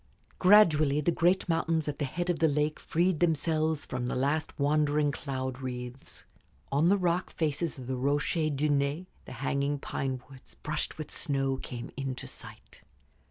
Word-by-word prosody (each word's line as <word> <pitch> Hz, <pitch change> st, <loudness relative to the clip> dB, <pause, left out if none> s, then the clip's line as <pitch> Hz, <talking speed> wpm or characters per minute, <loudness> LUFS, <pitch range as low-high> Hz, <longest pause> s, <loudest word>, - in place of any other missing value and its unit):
Gradually 155 Hz, -8 st, +6 dB
the 150 Hz, +3 st, +2 dB
great 175 Hz, +4 st, +2 dB
mountains 165 Hz, -2 st, +1 dB
at 145 Hz, -1 st, -3 dB
the 145 Hz, -, 0 dB
head 175 Hz, +6 st, -1 dB
of 170 Hz, -, -3 dB
the 165 Hz, -, +4 dB
lake 150 Hz, +1 st, 0 dB
freed 175 Hz, 0 st, +1 dB
themselves 160 Hz, -2 st, +1 dB
from 125 Hz, -1 st, -3 dB
the -, -, -2 dB
last 145 Hz, +4 st, -1 dB
wandering 150 Hz, 0 st, +2 dB
cloud 130 Hz, -2 st, -4 dB
wreaths. 125 Hz, 0 st, -7 dB, 0.5 s
On 150 Hz, +5 st, +3 dB
the 200 Hz, -, +5 dB
rock 180 Hz, -1 st, 0 dB
faces 155 Hz, 0 st, -1 dB
of 130 Hz, -, -8 dB
the 130 Hz, +1 st, -3 dB
Rochers 145 Hz, +4 st, +1 dB
de 150 Hz, +3 st, +1 dB
Naye 145 Hz, +4 st, 0 dB, 0.2 s
the -, -, -9 dB
hanging 140 Hz, +2 st, -1 dB
pine 135 Hz, -1 st, -3 dB
woods, 130 Hz, -1 st, -15 dB
brushed 150 Hz, -, -3 dB
with 155 Hz, -2 st, -7 dB
snow, 135 Hz, -2 st, 0 dB
came 120 Hz, -2 st, -7 dB
into 135 Hz, -2 st, -4 dB
sight. -, -, -10 dB
145 Hz, 165 wpm, -29 LUFS, 135-160 Hz, 0.5 s, Gradually